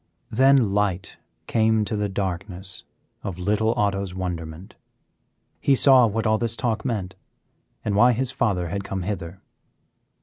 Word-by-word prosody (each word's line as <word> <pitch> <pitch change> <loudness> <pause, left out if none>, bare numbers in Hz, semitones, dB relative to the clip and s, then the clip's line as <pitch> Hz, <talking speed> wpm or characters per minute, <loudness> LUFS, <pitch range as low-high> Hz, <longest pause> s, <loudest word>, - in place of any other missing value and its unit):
Then 130 -3 +4
light 100 -3 -1 0.3
came 110 -1 +2
to 110 - -3
the 105 -1 -1
darkness 95 0 -5 0.4
of 95 -3 -5
little 105 +4 +1
Otto's 100 -2 -1
wonderment; 85 -1 -5 0.9
he 140 - +3
saw 130 -2 +6
what 110 +2 -2
all 110 0 +2
this 115 -1 -1
talk 110 -1 -1
meant 105 -8 -3 0.7
and 105 - 0
why 120 +4 +5
his 130 +2 0
father 90 -9 0
had 100 +3 -3
come 95 -1 -4
hither. 90 -2 -5
105 Hz, 140 wpm, -24 LUFS, 95-110 Hz, 0.9 s, saw